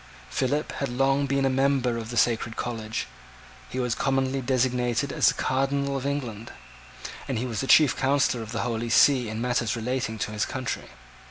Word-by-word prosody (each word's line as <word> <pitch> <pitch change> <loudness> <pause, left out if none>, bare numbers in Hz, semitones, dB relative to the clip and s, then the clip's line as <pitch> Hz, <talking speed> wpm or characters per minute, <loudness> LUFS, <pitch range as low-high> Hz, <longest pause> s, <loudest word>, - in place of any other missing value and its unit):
Philip 140 +3 -1
had 140 - -3
long 135 +3 +1
been 140 0 +1
a - - +3
member 135 -2 +1
of 115 -1 -6
the 120 - -4
sacred 115 -1 +1
college: 115 -2 -3 0.6
he 130 - -4
was 125 -2 0
commonly 135 +1 0
designated 125 0 0
as - - +3
the - - +4
Cardinal 140 +1 0
of 135 0 -2
England; 120 -6 -4 0.8
and 130 - -2
he 120 - -2
was 115 -4 -3
the 135 - -3
chief 150 0 +6
counsellor 135 -2 +1
of 110 -1 -7
the 115 - -2
Holy 115 -1 -2
See 125 0 +4
in 110 +1 -4
matters 120 -2 0
relating 120 0 -2
to 105 - -3
his 105 0 -1
country. 130 -2 -4
125 Hz, 185 wpm, -26 LUFS, 115-135 Hz, 0.8 s, chief